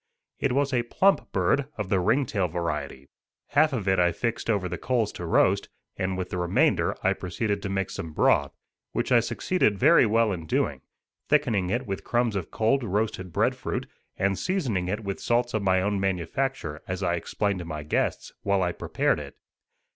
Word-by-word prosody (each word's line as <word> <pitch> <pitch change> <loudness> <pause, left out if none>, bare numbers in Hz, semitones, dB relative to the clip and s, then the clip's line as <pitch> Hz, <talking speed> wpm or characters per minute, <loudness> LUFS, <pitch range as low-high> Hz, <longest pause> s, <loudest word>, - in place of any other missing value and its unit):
It 140 -3 +1
was 140 +1 +1
a 120 - +3
plump 190 +11 +2
bird, 100 +9 +1
of 105 -3 -3
the 95 - +2
ring 115 +10 +2
tail 100 -6 0
variety. 80 -5 -4 0.4
Half 155 +2 +4
of 110 -7 -3
it 95 -1 +3
I 90 0 +4
fixed 115 +6 -3
over 100 -4 +1
the 90 0 -5
coals 120 -5 0
to 85 - -6
roast, - - +3 0.3
and 95 0 -2
with 90 -1 -4
the 90 - -2
remainder 90 0 +2
I 95 - +3
proceeded 100 +2 -2
to 100 - -4
make 95 -1 -1
some 80 - -5
broth, - - +3 0.4
which - - -1
I 120 - +7
succeeded 115 - 0
very 145 - +6
well 115 0 +3
in 85 -4 -5
doing, - - 0 0.5
thickening 95 -5 +2
it 120 +6 -1
with 95 -3 -4
crumbs 120 -3 0
of 95 -4 -3
cold 120 +5 +1
roasted 105 -3 -2
bread - - +1
fruit, - - -3 0.3
and 95 0 0
seasoning 130 - -1
it 105 +4 -2
with 100 -1 -4
salt 120 +1 +1
of 110 - 0
my 95 -1 +2
own 100 0 0
manufacture, 95 - -2
as 90 +1 -3
I 85 -2 +1
explained 100 +3 -1
to 90 - -6
my 75 -2 -5
guests, 75 - -1
while 100 -2 +1
I 90 - +1
prepared - - 0
it. - - -9
100 Hz, 195 wpm, -26 LUFS, 90-120 Hz, 0.5 s, I